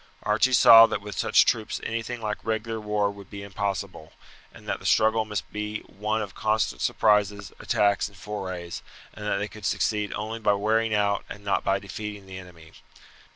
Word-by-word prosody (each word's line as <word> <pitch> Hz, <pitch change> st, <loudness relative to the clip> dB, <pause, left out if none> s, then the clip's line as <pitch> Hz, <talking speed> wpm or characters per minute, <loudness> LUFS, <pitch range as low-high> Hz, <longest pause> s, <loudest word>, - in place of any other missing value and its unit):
Archie 110 Hz, +5 st, +2 dB
saw 115 Hz, -2 st, +9 dB
that -, -, -2 dB
with 105 Hz, 0 st, -8 dB
such -, -, +4 dB
troops 110 Hz, -2 st, -1 dB
anything 115 Hz, +1 st, -4 dB
like 105 Hz, -1 st, -3 dB
regular 110 Hz, 0 st, -2 dB
war 105 Hz, -1 st, 0 dB
would 100 Hz, -2 st, -13 dB
be 100 Hz, 0 st, -8 dB
impossible, 100 Hz, -4 st, -4 dB, 0.4 s
and -, -, -16 dB
that -, -, -2 dB
the -, -, -14 dB
struggle 110 Hz, 0 st, +3 dB
must 105 Hz, -2 st, -5 dB
be 105 Hz, 0 st, -4 dB
one 105 Hz, +2 st, -3 dB
of 100 Hz, -2 st, -8 dB
constant 110 Hz, -, -1 dB
surprises, 105 Hz, -2 st, +1 dB
attacks, 100 Hz, -1 st, +1 dB
and 100 Hz, -2 st, -16 dB
forays, 90 Hz, -5 st, -6 dB, 0.3 s
and 105 Hz, 0 st, -7 dB
that 105 Hz, -, +1 dB
they 100 Hz, +1 st, -2 dB
could 105 Hz, 0 st, -13 dB
succeed 105 Hz, 0 st, 0 dB
only 110 Hz, +2 st, -4 dB
by 105 Hz, -2 st, +2 dB
wearing 110 Hz, +2 st, +1 dB
out 100 Hz, -1 st, +1 dB
and 100 Hz, -, -9 dB
not 100 Hz, -, 0 dB
by 95 Hz, -, +2 dB
defeating 105 Hz, +1 st, -7 dB
the 95 Hz, -1 st, -8 dB
enemy. 85 Hz, -3 st, -14 dB
105 Hz, 185 wpm, -26 LUFS, 100-110 Hz, 0.4 s, saw